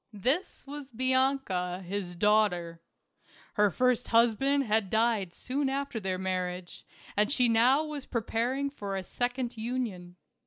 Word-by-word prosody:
This 260 - -1
was 285 -1 -8
Bianca, 255 -8 +1
his 185 -2 -4
daughter. 175 -4 +2 0.7
Her 210 0 +4
first 250 +5 +1
husband 240 +5 +3
had 215 -4 +1
died 220 -4 +1
soon 270 +1 -1
after 275 -3 -2
their 190 -2 -2
marriage, 185 -1 -4 0.3
and 210 +5 +2
she 250 -3 +3
was 230 - +2
now 255 +7 +4 0.2
prepar 235 +2 -1
ing 280 0 -1
for 200 -8 -4
a 190 - -4
second 245 +3 -2
union. 220 -7 -4
225 Hz, 140 wpm, -29 LUFS, 190-260 Hz, 0.7 s, Her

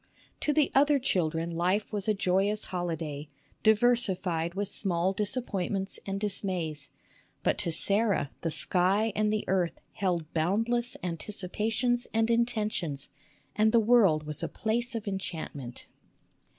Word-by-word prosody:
To 300 - +1
the 295 -1 +3
other 285 +1 +5
children 170 - 0
life 185 +6 0
was 205 -1 -2
a 215 - +3
joyous 195 +3 +1
holiday, 160 -4 -3 0.3
diversified 195 -7 +2
with 200 +1 -1
small 185 -2 0
disappointments 195 -3 -2
and 195 0 -2
dis 205 -1 -2
mays; 160 -7 -3 0.5
but - - +1
to 170 - +1
Sarah 200 -2 +2
the 165 - -1
sky 190 +6 +1
and 210 0 +2
the 215 0 0
earth 180 -3 0
held 175 -5 -1
boundless 225 +9 +1
anticipations 215 +7 -1
and 225 +1 +3
intentions, 215 - -1 0.4
and 215 +1 +4
the 235 - +5
world 210 -9 +4
was 150 -1 -6
a - - -1
place 235 +3 -2
of 220 -2 -4
enchantment. 160 -9 -5
195 Hz, 135 wpm, -29 LUFS, 170-220 Hz, 0.5 s, other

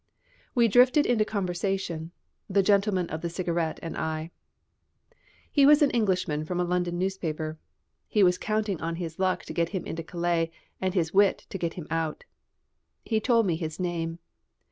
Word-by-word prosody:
We 235 -2 +5
drifted 250 +6 +5
into 220 -3 +2
conversation, 185 -4 -2 0.4
the 195 0 +3
gentleman 195 -2 +2
of 160 +1 -4
the 170 - -2
cigarette 170 -2 -1
and 165 - -5
I. 160 +1 -3 1.2
He 285 - +4
was 295 +2 +7
an 285 - +3
Englishman 185 -9 0
from 180 +3 -3
a - - +2
London 175 0 -1
newspaper. 160 -4 -3 0.5
He 210 - +3
was 180 -1 +4
counting 215 -4 -1
on 165 +1 -2
his 165 -1 -6
luck 185 -1 0
to - - -7
get 170 -1 0
him 190 -3 -4
into 165 - -4
Calais 170 0 -1 0.3
and 190 0 -1
his 165 -3 0
wit 200 0 +3
to - - -3
get 170 -1 -2
him 175 - -6
out. 165 -1 -2 0.8
He 220 -2 +1
told 230 0 +3
me 175 -4 +1
his 160 -1 -5
name. 170 -2 -2
180 Hz, 170 wpm, -27 LUFS, 165-200 Hz, 1.2 s, was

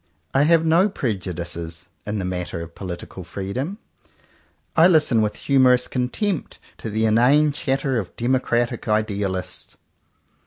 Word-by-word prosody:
I 135 +2 +4
have 165 0 +4
no 170 +6 +4
prejudices 85 - -4 0.2
in 105 +1 -2
the 95 - -2
matter 90 -2 -3
of 85 0 -8
political 90 0 -7
freedom. 100 - -4 1.0
I 165 +1 +7
listen 150 -10 +4
with 105 -1 0
humourous 130 -2 +3
contempt 145 - -2 0.2
to 110 - -6
the 110 +1 0
inane 130 +7 +4
chatter 135 -2 -1
of 95 - -7
Demo 130 +2 +1
cratic 120 -1 -1
Idealists. 100 -3 -2
115 Hz, 130 wpm, -22 LUFS, 95-140 Hz, 1.0 s, I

